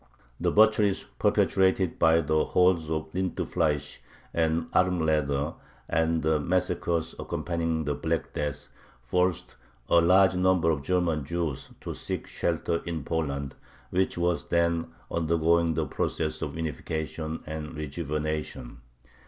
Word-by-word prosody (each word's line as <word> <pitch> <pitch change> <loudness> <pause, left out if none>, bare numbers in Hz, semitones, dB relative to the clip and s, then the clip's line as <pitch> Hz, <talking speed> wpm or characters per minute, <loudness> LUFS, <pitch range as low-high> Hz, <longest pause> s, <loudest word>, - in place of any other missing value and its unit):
The - - +1
butcheries 105 -2 +4 0.2
perpetrated 95 -2 +2
by 80 0 +5
the 80 0 +2
hordes 90 -3 +2
of 80 0 -3
Rindfleisch 80 -5 -1 0.3
and 80 0 +1
Armleder, 80 -5 +1 0.3
and 80 0 +1
the 80 -1 +2
massacres 85 0 0
accompanying 80 -2 -2
the 75 - 0
Black 80 +3 -2
Death, 75 -1 -3 0.4
forced 90 +6 0 0.3
a 85 - +5
large 95 +2 +5
number 90 -2 +3
of 75 -3 -1
German 85 -2 0
Jews 80 -2 -3
to - - -5
seek - - -4
shelter 85 - -1
in 85 -4 -4
Poland, 70 -4 -2 0.4
which 95 0 +1
was 85 0 0
then 85 -1 +1 0.2
undergoing 85 0 +2
the 80 0 0
process 80 0 -2
of 75 -2 -4
unification 80 0 -4
and 75 0 -6
rejuvenation. 75 -4 -4
80 Hz, 120 wpm, -27 LUFS, 75-85 Hz, 0.4 s, by